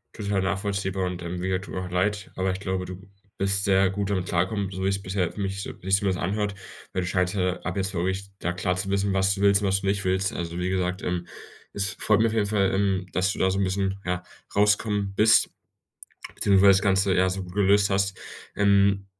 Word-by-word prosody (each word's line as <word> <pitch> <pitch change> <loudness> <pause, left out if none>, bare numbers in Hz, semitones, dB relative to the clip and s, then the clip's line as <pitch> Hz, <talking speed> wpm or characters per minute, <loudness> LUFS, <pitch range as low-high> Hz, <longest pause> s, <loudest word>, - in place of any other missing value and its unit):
Total 100 -2 -1
nachvollziehbar 95 0 -1
und, 90 -1 -4
ähm, 85 +1 -5
mir 95 +1 -1
tut 95 - -9
auch 95 -1 -4
leid, 100 +2 -1
aber 95 0 0
ich 95 - -4
glaube, 95 -2 -2
du 95 +2 -9 0.3
bist 100 0 +1
sehr 95 -1 +3
gut 100 0 -2
damit 95 -3 -1
klargekommen, 95 +3 -1
so 95 0 -5
wie's 95 0 0
bisher 95 -2 -1
für - - -11
mich 95 0 -2
so - - -6
wie - - -16
sich's 95 0 +4
zumindest 95 -3 -1
anhört. 100 +2 -1 0.4
Weil 95 - -2
du - - -3
scheinst 90 +1 0
ja, 90 -1 0
ab 90 +2 -4
jetzt 95 0 -1
wirklich 95 +2 -1
da 85 - -1
klar 90 +1 -1
zu 95 +1 -3
wissen, 100 0 0
was 95 0 +2
du 100 - -5
willst 100 0 +4
und 100 - 0
was 95 +1 +2
du 100 - -3
nicht 100 0 0
willst. 95 +1 0
Also, 85 0 -4
wie 90 +1 -1
gesagt, 90 0 -1
ähm, 90 -1 -2 0.5
es 100 -2 -2
freut 110 -1 +3
mich 115 - +4
auf 110 - -2
jeden 105 -2 +1
Fall, 100 -2 +1
ähm, 95 -1 +1
dass 95 +1 +1
du - - -6
da 95 - +3
so 95 - -1
'n - - +2
bisschen, 95 +1 -1
ja, 90 0 -2 0.3
rauskommen 105 -1 +2
bist, 110 +2 +5 0.8
beziehungsweise 100 0 +5
das 95 - +2
Ganze, 95 -1 +2
ja, 95 +1 +3
so 95 0 -4
gut 90 0 -11
gelöst 100 0 +4
hast. 100 -1 0 0.4
Ähm, 100 -1 +3
95 Hz, 235 wpm, -25 LUFS, 95-100 Hz, 0.8 s, bist